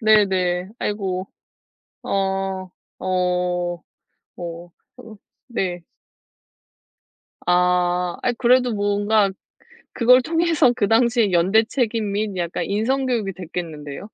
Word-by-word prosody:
네, 215 -2 +5
네. 180 -1 -1
아이고. 190 -2 -3 0.7
어 - - -7 0.9
어 180 -2 -1 0.5
어 170 0 -7 0.3
으 220 -2 -12 0.3
네. 185 -8 -3 1.6
아 180 0 +2
아이 250 - +1
그래도 250 0 +3
뭔가 205 0 +2
그 - - -12 0.6
그걸 250 +2 +5
통해서 325 -3 +2
그 205 -5 +1
당시에 230 -2 +3
연대 185 +6 +4
책임 225 -3 -1
및 205 0 -2
약간 170 -1 -2
인성 245 +7 0
교육이 220 -6 -1
됐겠는데요. 165 -1 -7
200 Hz, 190 characters per minute, -22 LUFS, 180-225 Hz, 1.6 s, 네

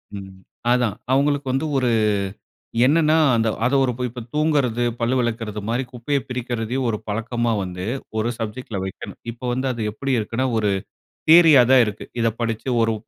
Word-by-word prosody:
ம். 95 -1 -8 0.4
அதான் 125 -4 +2 0.2
அவங்ளுக்கு 140 0 +1
வந்து 135 +4 0
ஒரு 125 -2 +2
அ - - +2 0.8
என்னன்னா 155 +2 +4 0.2
அந்த 115 -1 +2 0.2
அத 130 - +1
ஒரு 125 - +1 0.2
இப்போ 120 +1 -8
தூங்குறது, 145 -6 +1 0.2
பல்லு 120 +3 +1
விளக்கிறது 115 -3 -2
மாரி 125 +3 0
குப்பைய 125 +4 -1
பிரிக்கிறதையும் 125 0 -2
ஒரு 105 - -1
பழக்கமா 115 +2 -1
வந்து 90 0 -5 0.3
ஒரு 110 +2 0
சப்ஜெக்ட்‌ல 110 -2 -5
வைக்கணும். 95 - -8
இப்ப 115 - -16
வந்து, 130 +2 -1
அது 115 -3 -3
எப்டி 135 +6 -3
இருக்குன்னா 115 +4 -2
ஒரு 105 -2 +1 0.6
தியரியா 160 -6 +8
தான் 130 -2 +7
இருக்கு. 105 0 -5 0.2
இத 115 - +3
படிச்சி 115 +2 -2
ஒரு 115 0 +1
120 Hz, 160 wpm, -22 LUFS, 110-130 Hz, 0.8 s, தியரியா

